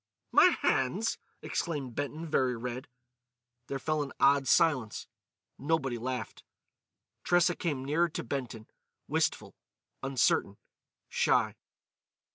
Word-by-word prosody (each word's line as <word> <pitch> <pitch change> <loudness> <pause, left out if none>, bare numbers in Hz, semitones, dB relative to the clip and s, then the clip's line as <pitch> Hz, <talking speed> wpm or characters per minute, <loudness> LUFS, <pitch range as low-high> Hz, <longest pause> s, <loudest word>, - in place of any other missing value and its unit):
"My - - +7 0.2
hands!" 175 - +1 0.2
exclaimed 145 -7 -3
Benton, 145 +5 -4
very 130 -5 +1
red. 125 +2 -5 0.8
There 140 - -3
fell 155 +3 -1
an 140 -2 -4
odd 140 -1 +4
silence. 140 -11 +2 0.5
Nobody 135 -4 0
laughed. 125 -2 -4 0.8
Tressa 175 0 +3
came 145 -6 -2
nearer 165 +5 +2
to - - -5
Benton, 120 -3 -5 0.4
wistful, - - -1 0.5
uncertain, 125 -6 +1 0.5
shy. - - +2
135 Hz, 100 wpm, -30 LUFS, 125-155 Hz, 0.8 s, My